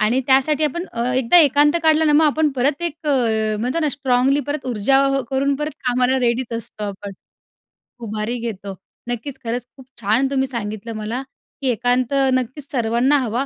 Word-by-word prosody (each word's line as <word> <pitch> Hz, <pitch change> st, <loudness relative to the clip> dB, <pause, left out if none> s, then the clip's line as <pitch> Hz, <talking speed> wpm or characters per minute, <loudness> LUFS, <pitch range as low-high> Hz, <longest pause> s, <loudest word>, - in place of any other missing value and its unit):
आणि 235 Hz, +5 st, +2 dB
त्यासाठी 275 Hz, +3 st, +3 dB
आपण 345 Hz, +5 st, -2 dB
अ, 235 Hz, 0 st, -2 dB
एकदा 260 Hz, +6 st, +3 dB
एकांत 295 Hz, -1 st, +5 dB
काढलं 315 Hz, 0 st, +4 dB
ना, 300 Hz, -, +3 dB
मग 310 Hz, +2 st, +5 dB
आपण 305 Hz, 0 st, +2 dB
परत 280 Hz, +6 st, 0 dB
एक 325 Hz, -1 st, -4 dB
अ, 220 Hz, -6 st, +1 dB
म्हणतो 255 Hz, +8 st, -1 dB
ना, 305 Hz, -, +1 dB
स्ट्राँगली 270 Hz, 0 st, +1 dB
परत 290 Hz, -1 st, -4 dB
ऊर्जा 255 Hz, +3 st, +2 dB, 0.3 s
करून 275 Hz, +1 st, +1 dB
परत 300 Hz, 0 st, -3 dB
कामाला 250 Hz, +1 st, +2 dB
रेडीच 240 Hz, 0 st, 0 dB
असतो 215 Hz, -1 st, -6 dB
आपण. 200 Hz, 0 st, -6 dB, 0.9 s
उभारी 215 Hz, +2 st, -3 dB
घेतो. 200 Hz, -4 st, -6 dB, 0.3 s
नक्कीच, 255 Hz, +3 st, -5 dB
खरंच 235 Hz, +1 st, -3 dB
खूप 265 Hz, -, -13 dB, 0.2 s
छान 220 Hz, +6 st, +2 dB
तुम्ही 265 Hz, -1 st, +1 dB
सांगितलं 225 Hz, -2 st, -5 dB
मला, 220 Hz, +4 st, -4 dB, 0.4 s
की 270 Hz, -, -1 dB
एकांत 245 Hz, +2 st, 0 dB, 0.2 s
नक्कीच 260 Hz, +4 st, -3 dB
सर्वांना 245 Hz, +3 st, +2 dB
हवा. 250 Hz, +2 st, -1 dB
255 Hz, 170 wpm, -20 LUFS, 230-285 Hz, 0.9 s, एकांत